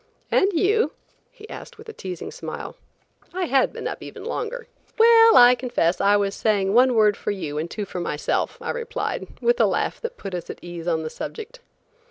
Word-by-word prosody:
"And 390 Hz, -, +3 dB
you?" 405 Hz, +6 st, +2 dB, 0.4 s
he 435 Hz, -4 st, -14 dB
asked -, -, -10 dB
with 440 Hz, +1 st, -14 dB
a 445 Hz, -, -8 dB
teasing 185 Hz, -, -7 dB
smile. -, -, -7 dB, 0.6 s
I 370 Hz, -1 st, 0 dB
had 270 Hz, -4 st, +2 dB
been -, -, -5 dB
up -, -, -6 dB
even -, -, -9 dB
longer. 480 Hz, +1 st, -4 dB, 0.3 s
"Well, 455 Hz, 0 st, +7 dB
I 245 Hz, 0 st, +9 dB
confess, 240 Hz, -9 st, 0 dB
I 200 Hz, +1 st, +4 dB
was 200 Hz, -1 st, 0 dB
saying 200 Hz, -3 st, +1 dB
one 250 Hz, +1 st, +5 dB
word 210 Hz, -2 st, +4 dB
for -, -, -5 dB
you 155 Hz, -8 st, -3 dB
and 165 Hz, +2 st, -4 dB
two 210 Hz, +2 st, -4 dB
for 185 Hz, -, -6 dB
myself," 150 Hz, -3 st, -2 dB
I -, -, -3 dB
replied, 475 Hz, -1 st, -4 dB
with 480 Hz, +1 st, +2 dB
a -, -, +5 dB
laugh -, -, -1 dB
that 470 Hz, 0 st, -5 dB
put 195 Hz, -, -7 dB
us 175 Hz, -1 st, -5 dB
at -, -, -6 dB
ease 175 Hz, -1 st, -7 dB
on 160 Hz, -2 st, 0 dB
the 155 Hz, -, -5 dB
subject. 455 Hz, +3 st, -7 dB
245 Hz, 205 wpm, -23 LUFS, -, 0.6 s, I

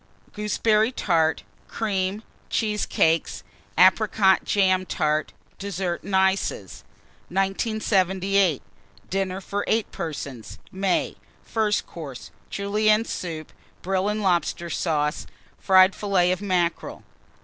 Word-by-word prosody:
Gooseberry 215 Hz, +2 st, +1 dB
Tart. 165 Hz, -9 st, +1 dB, 0.2 s
Cream. 200 Hz, -1 st, -2 dB, 0.3 s
Cheesecakes. 210 Hz, -7 st, 0 dB, 0.3 s
Apricot 190 Hz, +1 st, +4 dB
jam 185 Hz, -2 st, +2 dB
Tart. 155 Hz, -3 st, -1 dB, 0.3 s
DESSERT 190 Hz, -3 st, -3 dB
AND 200 Hz, -, -3 dB
ICES. 190 Hz, -, 0 dB, 0.5 s
1978. 195 Hz, -, +1 dB, 0.5 s
DINNER 190 Hz, 0 st, -1 dB
FOR 200 Hz, +2 st, -3 dB
8 220 Hz, -1 st, 0 dB
PERSONS 140 Hz, -7 st, -6 dB
(May). 190 Hz, -1 st, -1 dB, 0.3 s
FIRST 215 Hz, -2 st, 0 dB
COURSE. 145 Hz, -7 st, -9 dB, 0.2 s
Julienne 215 Hz, +2 st, +1 dB
Soup. 160 Hz, -7 st, -5 dB, 0.3 s
Brill 190 Hz, +2 st, 0 dB
and 210 Hz, 0 st, -2 dB
Lobster 175 Hz, -2 st, 0 dB
Sauce. 150 Hz, -2 st, -1 dB, 0.3 s
Fried 190 Hz, 0 st, +5 dB
Fillets 185 Hz, -3 st, +1 dB
of 185 Hz, -, -5 dB
Mackerel. 180 Hz, -4 st, -1 dB
190 Hz, 95 wpm, -24 LUFS, 175-205 Hz, 0.5 s, Fried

